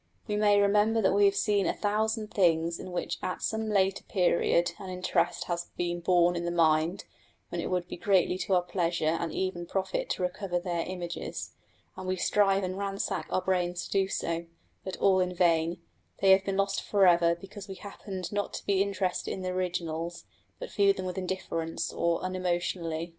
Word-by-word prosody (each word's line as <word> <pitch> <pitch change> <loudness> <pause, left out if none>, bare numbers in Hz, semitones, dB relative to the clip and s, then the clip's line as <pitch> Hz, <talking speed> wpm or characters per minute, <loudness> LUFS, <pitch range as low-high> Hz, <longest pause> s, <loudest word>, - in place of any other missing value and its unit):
We 210 - -1
may 205 -1 +4
remember 210 +2 +3
that 190 -3 +3
we 205 0 +5
have 200 0 +4
seen 205 -2 +2
a - - 0
thousand 215 +1 -1
things 170 -3 +2
in 185 - -7
which 175 - -3
at 185 - -3
some 220 0 -1
later 195 -2 +2
period 175 -2 +2
an 190 -2 -7
interest 185 0 0
has 175 0 -3
been 175 0 -1
born 175 0 +3
in 170 - -2
the 170 - -1
mind, 165 +1 +2 0.4
when - - -3
it - - -3
would 180 -1 -1
be - - -7
greatly 185 -1 +2
to 190 - +1
our 180 - +3
pleasure 170 -2 -1
and 170 -2 -2
even 175 -1 -3
profit 190 +1 -2
to - - -1
recover 180 0 -2
their 175 -2 -2
images, 175 -2 -5 0.4
and 185 - -7
we 185 - +1
strive 195 +1 +2
and 185 +1 -3
ransack 195 0 -2
our 185 - 0
brains 180 -1 0
to - - -11
do 195 -1 +2
so, 170 -2 -2 0.4
but 190 - -5
all 190 -1 +4
in 180 0 0
vain: 170 -1 +2 0.4
they 195 - +5
have 190 0 +6
been 195 0 -2
lost 195 0 +1
for 200 -2 +3
ever 170 -1 +5
because 195 +3 -10
we 190 - -7
happened 190 -2 -7
not 205 -1 -2
to - - -7
be 195 -1 +2
interested 195 -2 -1
in 190 - -4
the 185 - -2
originals, 175 -2 -3 0.3
but - - -7
viewed 200 -1 +3
them 185 - -4
with 185 +1 -3
indifference, 170 -3 -3
or 170 0 0
unemotionally. 175 -2 -2
185 Hz, 195 wpm, -29 LUFS, 175-195 Hz, 0.4 s, have